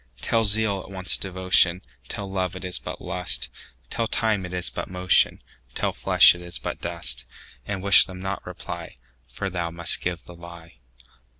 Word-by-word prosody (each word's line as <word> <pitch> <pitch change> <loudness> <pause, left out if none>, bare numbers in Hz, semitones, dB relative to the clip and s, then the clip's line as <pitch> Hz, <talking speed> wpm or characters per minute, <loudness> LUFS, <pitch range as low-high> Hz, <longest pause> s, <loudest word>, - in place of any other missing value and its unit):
Tell 115 - +1
zeal 100 -1 +2
it - - -13
wants 95 -2 0
devotion; 95 -1 +2 0.2
Tell 100 - -6
love 95 -2 -3
it 95 - -7
is 90 -1 -1
but - - -8
lust; 90 -1 0 0.4
Tell 115 - -1
time 110 -5 0
it - - -12
is 90 -1 -1
but - - -6
motion; 90 -1 +2 0.3
Tell - - -1
flesh - - +7
it 90 - -10
is 90 0 -5
but - - -6
dust:And 95 +11 -4
wish 100 0 +7
them 90 -1 -9
not 95 +1 -4
reply, - - -8 0.3
For 65 +11 -5
thou 85 -2 -2
must 85 0 +2
give 90 -1 -3
the 90 - -13
lie. 85 -4 -13
90 Hz, 175 wpm, -24 LUFS, 85-95 Hz, 0.4 s, flesh